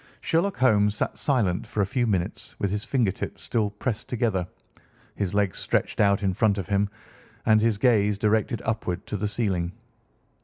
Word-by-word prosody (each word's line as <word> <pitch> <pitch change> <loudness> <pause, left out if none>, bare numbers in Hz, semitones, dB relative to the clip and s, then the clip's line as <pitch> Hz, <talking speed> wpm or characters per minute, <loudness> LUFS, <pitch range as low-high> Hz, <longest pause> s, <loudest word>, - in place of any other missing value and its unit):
Sherlock 180 +4 0
Holmes 105 -5 +3
sat - - -2
silent 110 -11 0
for - - -5
a - - +3
few 120 +4 0
minutes 95 -5 -2
with 100 - -1
his 105 +1 -2
fingertips 120 -9 -1
still 110 -3 0
pressed 105 +2 -4
together, 110 -7 0 0.7
his 100 -1 -2
legs 100 -2 +1
stretched - - -1
out 100 -1 +3
in 95 -1 +1
front 105 +1 +2
of 95 - -4
him, 100 0 +2 0.6
and 110 0 +5
his 115 -2 +2
gaze 105 -3 +3
directed 110 +2 +1
upward 110 -6 -2
to - - -4
the 105 +1 -1
ceiling. 95 -5 -1
105 Hz, 175 wpm, -26 LUFS, 100-115 Hz, 0.7 s, and